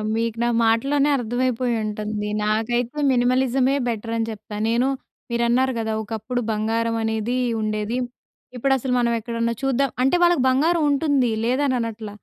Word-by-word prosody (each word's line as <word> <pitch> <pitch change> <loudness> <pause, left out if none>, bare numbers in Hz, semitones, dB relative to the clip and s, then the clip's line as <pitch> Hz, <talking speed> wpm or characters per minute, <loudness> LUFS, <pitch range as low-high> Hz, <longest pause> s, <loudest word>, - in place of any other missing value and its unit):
మీకు 230 0 -1
నా - - +2 0.2
మాటల్లోనే 275 +6 +2
అర్థమైపోయి 245 0 -1
ఉంటుంది. 210 0 -3 0.2
నాకైతే 240 +5 0
మినిమలిజమే 255 +2 +2
బెటర్ 225 0 -3
అని 225 0 -1
జెప్తా. 215 -1 -8
నేను 240 +3 +2 0.4
మీరన్నారు 240 +2 +2
గదా! 220 -1 -2
ఒకప్పుడు 225 +3 -3
బంగారం 225 +2 0
అనేది 220 +3 -1 0.2
ఉండేది. 215 +2 -2 0.6
ఇప్పుడు 270 +3 +1
అసలు 255 0 -2
మనం 235 -1 +2
ఎక్కడన్నా 230 +1 -2
చూద్దాం 270 +1 +1
అంటే 265 +6 +3
వాళ్ళకి 345 -7 +4
బంగారం 315 +5 +2
ఉంటుంది 280 -3 +2 0.2
లేదని 260 +2 +1
అనట్ల. 225 -2 -4
235 Hz, 135 wpm, -22 LUFS, 225-260 Hz, 0.6 s, వాళ్ళకి